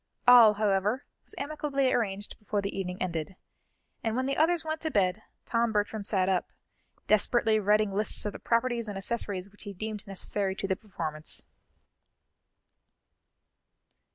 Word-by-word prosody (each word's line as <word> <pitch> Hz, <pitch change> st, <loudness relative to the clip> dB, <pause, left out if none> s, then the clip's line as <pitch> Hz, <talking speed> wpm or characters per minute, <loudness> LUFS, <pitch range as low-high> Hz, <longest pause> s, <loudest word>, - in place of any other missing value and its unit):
All, 235 Hz, -4 st, +9 dB
however, 210 Hz, +4 st, +1 dB, 0.2 s
was -, -, -16 dB
amicably 280 Hz, -2 st, -1 dB
arranged 205 Hz, -3 st, -2 dB
before 210 Hz, -1 st, -2 dB
the 200 Hz, 0 st, -3 dB
evening 185 Hz, -1 st, -4 dB
ended, 170 Hz, 0 st, -3 dB, 0.7 s
and 225 Hz, -1 st, -1 dB
when 260 Hz, +1 st, 0 dB
the 275 Hz, +1 st, 0 dB
others 325 Hz, +1 st, +2 dB
went 315 Hz, 0 st, -3 dB
to 315 Hz, -, -1 dB
bed, 200 Hz, -5 st, +1 dB, 0.2 s
Tom 230 Hz, -1 st, +1 dB
Bertram 210 Hz, 0 st, -1 dB
sat 190 Hz, -3 st, +1 dB
up, 190 Hz, -2 st, 0 dB, 0.5 s
desperately 215 Hz, +1 st, +3 dB
writing 210 Hz, 0 st, +2 dB
lists 210 Hz, +2 st, +2 dB
of 210 Hz, -, -2 dB
the -, -, -8 dB
properties 235 Hz, -1 st, 0 dB
and 205 Hz, -2 st, -5 dB
accessories 200 Hz, -2 st, -3 dB
which 210 Hz, -, -17 dB
he 205 Hz, -1 st, -7 dB
deemed 215 Hz, +2 st, -6 dB
necessary 195 Hz, 0 st, -1 dB
to 195 Hz, -, -3 dB
the 190 Hz, -, +1 dB
performance. 160 Hz, -7 st, -3 dB
210 Hz, 150 wpm, -29 LUFS, 195-235 Hz, 0.7 s, All